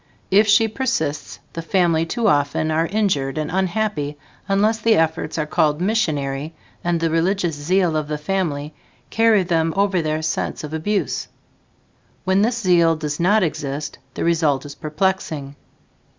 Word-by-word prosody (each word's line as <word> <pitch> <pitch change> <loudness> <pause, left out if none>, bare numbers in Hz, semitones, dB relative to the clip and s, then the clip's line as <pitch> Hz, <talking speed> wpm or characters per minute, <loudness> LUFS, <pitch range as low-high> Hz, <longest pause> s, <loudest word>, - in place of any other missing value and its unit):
If 205 +3 +5
she 220 +2 +5
persists, 210 - -2 0.2
the 165 - -4
family 165 -2 +1
too 235 +5 0
often 145 +2 +1
are 165 +2 +1
injured 160 -10 0
and 155 0 -2
unhappy 185 -5 -1 0.3
unless 210 +3 +2
the 225 0 +4
efforts 160 -1 0
are 155 - 0
called 150 0 +1
missionary 155 -7 -1 0.3
and 175 -1 0
the 165 -1 0
religious 175 +1 +1
zeal 170 +3 +1
of 155 -1 -1
the 150 0 -2
family 150 -3 -2 0.4
carry 225 -3 +4
them 165 -2 0
over 195 -3 +2
their 155 0 -2
sense 155 - -2
of 150 0 -6
abuse. 195 +6 -1 1.0
When 190 +1 +2
this 230 +2 +1
zeal 175 -6 +3
does 150 -1 -4
not 195 +4 +3
exist, 145 -2 -3 0.2
the - - -2
result 155 -5 +1
is 145 - -7
perplexing. 155 -3 -2
165 Hz, 150 wpm, -21 LUFS, 150-195 Hz, 1.0 s, If